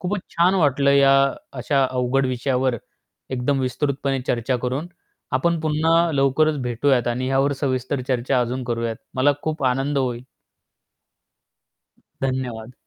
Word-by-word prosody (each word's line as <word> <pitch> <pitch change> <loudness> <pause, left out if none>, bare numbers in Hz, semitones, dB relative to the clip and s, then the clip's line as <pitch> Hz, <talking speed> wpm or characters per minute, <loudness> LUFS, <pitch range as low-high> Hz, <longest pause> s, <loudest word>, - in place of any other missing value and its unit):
खूपच 195 +2 -2 0.2
छान 175 +3 +4
वाटलं 140 -5 +3
या 140 -1 +5 0.5
अशा 135 +1 +2
अवघड 130 +1 +1
विषयावर 130 0 0 0.5
एकदम 130 +2 0
विस्तृतपणे 135 +1 -1
चर्चा 125 +1 0
करून. 130 +6 -2 0.5
आपण 165 +6 +1
पुन्हा 160 +2 +2
लवकरच 140 +2 +2
भेटूयात 125 +1 +1
आणि 125 +2 -2
यावर 135 +1 +2
सविस्तर 130 0 -1
चर्चा 125 -1 +1
अजून 125 +2 -2
करूयात. 115 -2 -2 0.2
मला 135 +3 +4
खूप 155 -3 -2
आनंद 135 +3 +1
होईल. 125 -3 -2 2.0
धन्यवाद. 125 -3 -3
135 Hz, 120 wpm, -22 LUFS, 125-145 Hz, 2.0 s, या